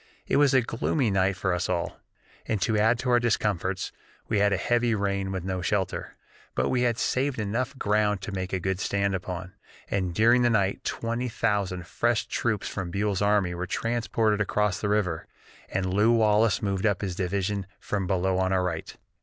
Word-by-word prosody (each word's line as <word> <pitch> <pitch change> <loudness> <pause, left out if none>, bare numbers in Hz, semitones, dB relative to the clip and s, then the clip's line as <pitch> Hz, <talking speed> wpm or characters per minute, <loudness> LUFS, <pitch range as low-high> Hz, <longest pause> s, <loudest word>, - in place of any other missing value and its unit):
It - - +1
was 140 -2 +4
a 130 - +5
gloomy 115 +1 0
night 95 0 +2
for 95 -1 0
us 90 +1 -1
all, 85 -2 -2 0.5
and 110 - 0
to 110 - +1
add 110 +3 +3
to 125 +1 -1
our 120 - +5
discomforts 100 -5 0 0.4
we 110 - +1
had 100 0 +3
a 100 - +2
heavy 120 +2 +1
rain 100 -1 -1
with 95 -2 -3
no 95 0 -2
shelter. 95 0 -2 0.4
But - - +1
we 125 - +1
had 120 -2 +1
saved 135 +2 0
enough 120 +6 -2
ground 105 -2 +1
to - - -4
make 95 -1 -4
a 95 0 -1
stand 100 -1 0
upon, 90 0 -5 0.4
and 95 -2 0
during 120 +4 +5
the 120 - +4
night 100 -4 +1
twenty 115 +2 -2
thousand 100 -6 -1
fresh 120 +5 0
troops 110 -4 -1
from 95 -3 -4
Buell's 100 +1 -1
army 100 -3 +2
were 85 +1 -4
transported 115 -1 0
across 105 -2 0
the 105 - -1
river, 95 -6 0 0.4
and 95 -1 -1
Lew 105 +4 +4
Wallace 110 -2 +3
moved 100 +1 +1
up 100 -3 0
his 95 -3 -2
division 100 +1 -1
from 100 -3 -2
below 95 0 +1
on 95 0 +1
our 95 -1 +2
right. 85 -3 -4
100 Hz, 190 wpm, -27 LUFS, 95-115 Hz, 0.5 s, a